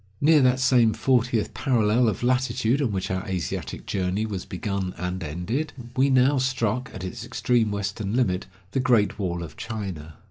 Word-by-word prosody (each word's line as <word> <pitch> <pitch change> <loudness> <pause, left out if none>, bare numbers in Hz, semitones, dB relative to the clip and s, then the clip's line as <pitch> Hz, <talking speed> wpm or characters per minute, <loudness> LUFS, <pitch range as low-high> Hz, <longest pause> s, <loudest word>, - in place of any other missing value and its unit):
Near 150 +1 +5
that 130 0 +3
same 125 -3 +4
fortieth 120 -1 +1
parallel 120 -3 +2
of 105 +2 -4
latitude 125 +1 +1
on 125 -6 +1
which 95 -2 -2
our 95 0 -1
Asiatic 95 -2 -4
journey 95 +2 -1
was 100 -4 -4
begun 95 0 -3
and 90 +1 -3
ended, 90 - -3 0.2
we 135 +2 +3
now 130 +1 +4
struck, 125 -2 0
at 95 - -8
its 110 +5 -5
extreme 120 -2 +1
western 100 +1 -3
limit, 95 -8 +1 0.2
the 135 - 0
Great 120 -5 +2
Wall 85 -3 -2
of 80 -2 -10
China. 95 -9 -6
110 Hz, 170 wpm, -25 LUFS, 95-125 Hz, 0.2 s, Near